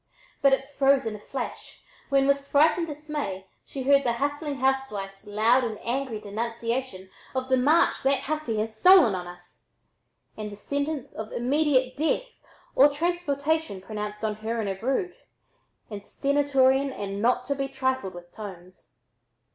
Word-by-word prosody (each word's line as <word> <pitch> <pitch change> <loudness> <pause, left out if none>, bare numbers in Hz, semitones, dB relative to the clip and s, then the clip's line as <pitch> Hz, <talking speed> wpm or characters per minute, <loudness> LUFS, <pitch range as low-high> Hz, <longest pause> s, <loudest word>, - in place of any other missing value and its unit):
But 275 -1 +5
it 270 0 0
froze 275 -1 +4
in 220 -1 -3
a - - -9
flash 250 +4 -7 0.3
when 275 -1 +3
with 280 0 +1
frightened 315 +4 +3
dismay 295 -11 -5 0.2
she 270 - -5
heard 280 +1 +5
the 240 -2 +1
hustling 290 +3 -2
housewife's 235 -7 -2
loud 225 +5 +3
and 225 -3 -3
angry 245 -2 -2
denunciation 230 0 -4 0.3
of 260 0 -2
"the 260 - +4
march 300 +7 +3
that 270 +1 +2
hussy 305 -7 -2
had 220 +1 -1
stolen 305 - +6
on 180 -1 -4
us," 175 0 -14 0.6
and 210 -1 -6
the - - -8
sentence 285 +5 -3
of 220 0 -7
"immediate 260 0 +1
death" - - -1 0.3
or 280 +3 +7
"transportation" 315 - -1
pronounced 210 +2 -5
on 210 -1 -2
"her 225 +2 -3
and 210 -3 -1
her 195 - -2
brood," 270 - -1 0.8
in 205 -1 -6
stentorian 275 +2 +2
and 200 -4 -5
not 250 +2 +2
to 280 - 0
be 275 0 -2
trifled 260 -7 -2
with 175 0 -11
tones. 185 -4 -11
260 Hz, 155 wpm, -26 LUFS, 215-280 Hz, 0.8 s, or